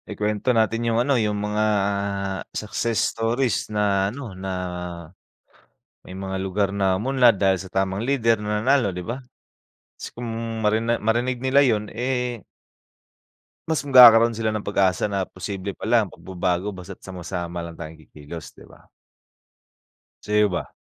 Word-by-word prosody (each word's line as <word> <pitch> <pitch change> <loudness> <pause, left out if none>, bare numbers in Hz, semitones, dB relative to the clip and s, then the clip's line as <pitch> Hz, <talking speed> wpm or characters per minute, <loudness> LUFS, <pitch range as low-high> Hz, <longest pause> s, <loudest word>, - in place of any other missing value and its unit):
Ikuwento 105 +3 -2
natin 115 +1 +1
yung 115 - +1
ano, 140 +3 +1
yung 105 -4 +1
mga 105 +1 -1 0.9
success 110 +1 -2 0.2
stories 115 +2 0
na 100 -2 +1
ano, 120 -2 -8
na 95 +1 -6 1.6
may 90 - -9
mga 95 0 -4
lugar 95 +1 0
na 95 -2 +1
umunlad 125 0 +3
dahil 95 -1 +3
sa 95 - -10
tamang 95 +1 0
lider 115 -4 +2
na 105 0 -1
nanalo, 130 -2 +3
'di 90 0 -5
ba? 125 +4 -5 0.8
Kasi - - -5
kung 120 0 -5 0.4
marina 110 +2 +2
marinig 120 +4 0
nila 135 +2 +4
yun 105 -5 +1
eh 125 0 -2 1.3
mas 160 -2 0
magkakaroon 120 -4 +8
sila 110 0 -1
ng 110 -1 -3
pag-asa 95 -2 +1
na 100 -2 -1
posible 95 +1 -5
pala 115 +1 +2
ang 105 - -4
pagbabago 95 +2 -3
basta't 95 0 -9
sama-sama 90 -2 -5
lang 85 -1 -8
tayong 80 -1 -9
kikilos, 75 +2 -9
di - - -14
ba? - - -20 1.3
Sa'yo 105 0 +2
ba? 85 -5 -4
105 Hz, 145 wpm, -23 LUFS, 95-115 Hz, 1.6 s, magkakaroon